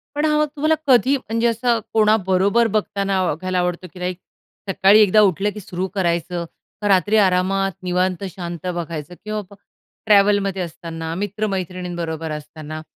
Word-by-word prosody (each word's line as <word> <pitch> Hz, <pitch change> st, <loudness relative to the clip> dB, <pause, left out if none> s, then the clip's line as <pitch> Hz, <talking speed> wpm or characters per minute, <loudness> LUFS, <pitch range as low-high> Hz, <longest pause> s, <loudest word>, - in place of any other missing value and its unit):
पण 295 Hz, +1 st, +1 dB
हा 300 Hz, -1 st, +2 dB
मग 300 Hz, -, +2 dB
तुम्हाला 310 Hz, +2 st, +2 dB
कधी 260 Hz, +1 st, +5 dB
म्हणजे 230 Hz, -2 st, -1 dB
असं 235 Hz, 0 st, +1 dB
कोणाबरोबर 215 Hz, 0 st, +3 dB
बघताना 200 Hz, -2 st, 0 dB
व 175 Hz, -, +1 dB
बघायला 185 Hz, +2 st, -2 dB
आवडतो, 180 Hz, 0 st, -2 dB
की 185 Hz, -, -12 dB
लाइक 180 Hz, 0 st, -3 dB, 0.5 s
सकाळी 195 Hz, +2 st, +5 dB
एकदा 215 Hz, +1 st, +5 dB
उठलं 195 Hz, 0 st, +2 dB
की 215 Hz, -, -7 dB
सुरू 185 Hz, -1 st, -4 dB
करायचं, 175 Hz, -1 st, -1 dB, 0.4 s
का 205 Hz, -, 0 dB
रात्री 205 Hz, +2 st, +3 dB
आरामात 195 Hz, 0 st, +2 dB
निवांत 180 Hz, +1 st, 0 dB
शांत 175 Hz, -2 st, -6 dB
बघायचं 170 Hz, -2 st, -4 dB
किंवा 215 Hz, 0 st, -3 dB
मग 200 Hz, -, -12 dB, 0.5 s
ट्रॅव्हलमध्ये 200 Hz, -2 st, +3 dB
असताना, 165 Hz, -1 st, -6 dB
मित्र-मैत्रिणींबरोबर 180 Hz, -5 st, -3 dB
असताना 155 Hz, +1 st, -7 dB
190 Hz, 150 wpm, -21 LUFS, 175-210 Hz, 0.5 s, कधी